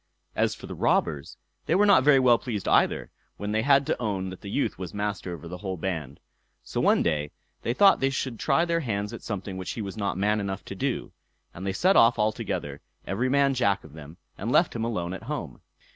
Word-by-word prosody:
As - - +1
for - - -11
the - - -7
robbers, 75 -3 0 0.3
they 165 - +2
were 205 +2 +5
not 200 -10 +6
very 145 0 +6
well 125 -3 +5
pleased 110 -6 -4
either, - - +2 0.3
when 105 +1 -4
they 110 +1 +1
had 140 +2 +4
to - - -1
own 95 -4 -2
that 95 - -10
the 100 - -8
youth 110 -3 -1
was 95 +1 -6
master 100 -3 -3
over 85 -1 -7
the 90 +1 -7
whole 95 -1 -4
band. 80 -6 -4 0.4
So - - -3
one - - +4
day 75 -3 0 0.3
they 120 - -1
thought 195 +4 +6
they 135 +1 +1
would 120 -5 -7
try 150 +5 +2
their 170 -1 +1
hands 105 -6 -3
at 115 - -7
something 100 -2 -5
which 95 - -4
he 115 - -5
was 100 +1 -7
not 100 -3 -2
man 105 +2 +1
enough 100 -2 -4
to - - -7
do; - - -2 0.4
and 95 +3 -6
they 95 - 0
set 185 - +3
off 115 +2 +6
all 105 +1 +2
together, 90 - -5 0.2
every 120 +7 -1
man 140 0 +3
Jack 100 -7 +1
of 80 - -14
them, 80 +1 -11 0.2
and 115 +5 -2
left 170 +2 +3
him 115 - -2
alone 90 -7 -2
at 95 - -6
home. - - -5
105 Hz, 235 wpm, -26 LUFS, 95-125 Hz, 0.4 s, not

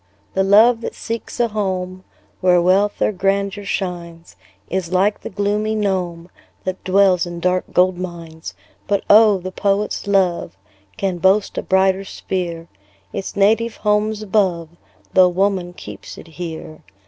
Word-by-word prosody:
The 190 - +1
love 225 +4 +5
that - - -5
seeks 230 +1 -6
a 235 -1 +2
home 185 -3 -3 0.4
Where 180 -1 +4
wealth 190 +4 +2
or - - +2
grandeur 200 +1 -1
shines, 175 -3 -5 0.3
Is 185 -2 -3
like 195 +3 +1
the - - -6
gloomy 210 +2 -1
gnome, 180 -4 -2 0.3
That 185 0 -4
dwells 185 -2 +3
in 175 0 -6
dark 180 +1 0
gold 180 0 +2
mines. 165 -3 -7 0.3
But 200 -1 0
oh! 210 -1 +7
the 185 0 -6
poet's 200 +2 -1
love 185 - +1 0.4
Can 190 -3 -2
boast 190 +4 +2
a - - -2
brighter 190 0 +2
sphere; 170 -4 -4 0.5
Its 195 - -5
native 220 +3 +2
home's 210 0 0
above, 185 -5 0 0.4
Tho' 185 -1 +6
woman 185 -1 0
keeps 175 - -10
it - - -11
here. 160 -1 -8
190 Hz, 145 wpm, -19 LUFS, 180-205 Hz, 0.5 s, oh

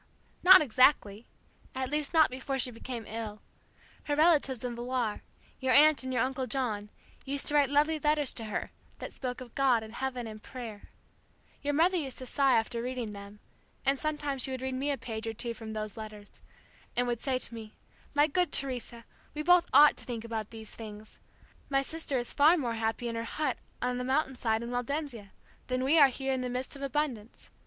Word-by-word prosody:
'" - - -35
"Not 370 -1 +10
exactly 240 -4 +3 0.5
at 260 0 -3
least, 300 -1 -1
not 315 -5 +5
before 265 +1 -3
she 250 -1 +2
became 235 0 -7
ill. 215 -1 -6 0.7
Her 290 - 0
relatives 295 -6 +3
in 245 -1 -3
Villar 240 -2 -2 0.4
your 260 -1 +1
Aunt 305 +1 +6
and 260 0 -4
your 250 -3 +2
Uncle 260 0 -2
John 220 -7 -2 0.3
used 280 +1 -1
to - - 0
write 290 -2 +4
lovely 300 +2 +2
letters 295 -2 +2
to 225 - -4
her, 215 - -4 0.3
that - - -7
spoke 250 -1 -5
of 245 -2 -10
God 255 -5 +3
and 220 0 -10
heaven 255 -1 -3
and 215 -1 -8
prayer. 230 -5 -9 0.7
Your 290 0 -1
mother 355 +4 +3
used 275 -6 -4
to 255 - -6
sigh 270 0 +3
after 230 +1 -1
reading 245 -3 -4
them, 200 0 -11 0.4
and 275 0 +2
sometimes 295 -3 -2
she 265 - +1
would 260 -1 -4
read 260 0 -2
me 270 +3 -1
a 280 - 0
page 225 -2 -6
or 225 - -2
two 235 +1 -2
from 225 -1 -8
those 215 -1 -4
letters, 215 -1 -9 0.6
and 245 - +2
would 240 -2 -2
say 265 -2 0
to 255 - -3
me, 220 -2 -9 0.4
'My 290 0 +6
good 345 +2 0
Teresa, 245 -3 0 0.3
we 300 - -3
both 355 +1 +5
ought 295 0 +7
to - - -4
think 235 -3 -5
about 220 -2 -4
these 220 -1 -7
things! 215 -1 -10 0.5
My 275 -1 +2
sister 315 -2 -2
is 240 -1 -2
far 310 +5 +5
more 245 -7 -1
happy 225 +1 -2
in 230 - -3
her 230 0 -3
hut 260 +2 -2 0.2
on 250 0 0
the - - -2
mountain 265 +1 0
side 225 -2 0
in 235 - -5
Waldensia 245 -3 -3 0.4
than 255 0 -1
we 300 +5 +4
are 285 - +9
here 265 +1 -2
in 260 - -1
the 250 - -3
midst 255 +3 -3
of 275 - -10
abundance. 275 -5 -3
255 Hz, 210 wpm, -30 LUFS, 230-280 Hz, 0.7 s, Not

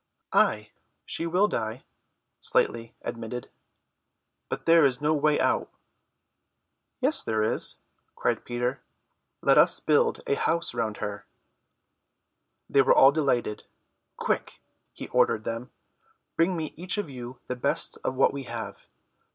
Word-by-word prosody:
"Ay, 105 0 +2 0.3
she 165 - -1
will 185 +5 +3
die," 110 - -4 0.6
Slightly 115 0 0
admitted, 115 +1 -6 1.0
"but - - -5
there 165 -1 +6
is 130 -3 +2
no 150 +1 +1
way 150 0 +2
out." - - +1 1.3
"Yes, - - +5
there 110 -1 -1
is," 110 - +2 0.4
cried - - -1
Peter. 125 +2 -3 0.6
"Let - - +5
us - - +6
build 465 -1 +2
a - - -8
little 435 +1 0
house 170 -4 +1
round 115 -3 -2
her." 105 0 -6 1.4
They 140 - +4
were 135 - +4
all 135 - +7
delighted. 130 -8 -1 0.5
"Quick," - - -2 0.3
he - - -8
ordered 110 - +2
them, 115 +3 -5 0.7
"bring 170 +2 +2
me 155 -2 -4
each 180 +5 0
of 205 - -2
you 125 0 -8
the 125 - -4
best 125 - -1
of 130 - -2
what 135 - +3
we 140 -1 -6
have. 115 -2 -7
130 Hz, 135 wpm, -26 LUFS, 115-160 Hz, 1.4 s, all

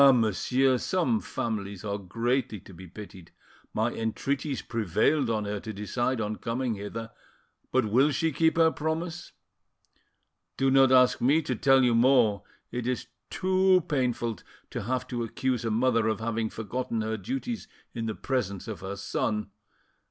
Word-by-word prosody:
monsieur, 125 +4 +2
some 185 - +1
families 100 -3 -4
are 100 0 -2
greatly 115 +4 -1
to 95 - -14
be 90 +2 -11
pitied! 95 -1 -11 0.4
My - - 0
entreaties 135 +5 -2
prevailed 115 - +1
on 110 -2 0
her 100 0 -3
to 110 - -6
decide 120 +5 -1
on 105 -1 -2
coming 120 +1 -2
hither, 115 +3 -6 0.6
but 130 -2 +3
will 125 +8 +4
she 160 +2 0
keep 160 +3 +2
her 165 -1 +5
promise? 160 +3 -3 1.3
Do 135 0 +2
not 135 -1 +6
ask 125 -1 +5
me 145 +6 +4
to 130 - -2
tell 135 +2 +4
you 120 -1 +4
more; 115 -4 +4 0.3
it 125 -1 -3
is 125 -1 -2 0.2
too 185 0 +3
painful 120 - -1 0.3
to - - -3
have 125 +5 -2
to 120 -1 -2
accuse 125 +1 -1
a 115 - -1
mother 115 0 +2
of 110 -1 0
having 115 0 -1
forgotten 115 +1 -3
her 110 0 -1
duties 245 - -4 0.3
in 115 -2 -3
the 110 - -3
presence 105 -7 -2
of 110 -3 -5
her 95 +1 -5
son 105 +1 -2
120 Hz, 160 wpm, -28 LUFS, 110-135 Hz, 1.3 s, not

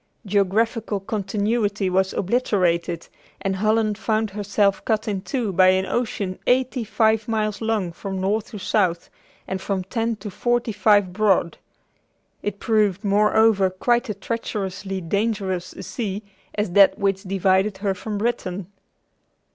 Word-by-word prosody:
Geographical 205 +2 +1
continuity 205 +1 -1
was 190 +1 +1
obliterated, 180 -6 0 0.3
and 195 -1 -2
Holland 215 +1 +1
found 220 -1 0
herself 200 0 +1
cut 215 -1 0
in 200 -3 -1
two 225 -2 -2
by 185 +1 +5
an 185 0 +3
ocean 200 -5 -2
eighty 255 0 +2
five 220 0 +1
miles 215 -2 -1
long 220 -6 0
from 190 +3 -5
north 205 +3 0
to 210 - -7
south, 185 -4 0 0.4
and 190 0 -3
from 190 -2 -2
ten 225 +4 -1
to 205 0 -8
forty 240 +3 0
five 205 -2 +3
broad. 195 -5 +2 0.8
It 205 -1 -3
proved, 210 -3 +1
moreover, 210 0 +4
quite 240 +6 0
as 210 - -2
treacherously 195 -3 -4
dangerous 195 -1 -1
a - - -9
sea 210 -3 -4 0.3
as 210 -3 -1
that 195 +1 +6
which 195 -1 0
divided 190 +1 +1
her 195 0 0
from 210 +2 -5
Britain." 200 -4 -2
205 Hz, 140 wpm, -23 LUFS, 190-220 Hz, 0.8 s, that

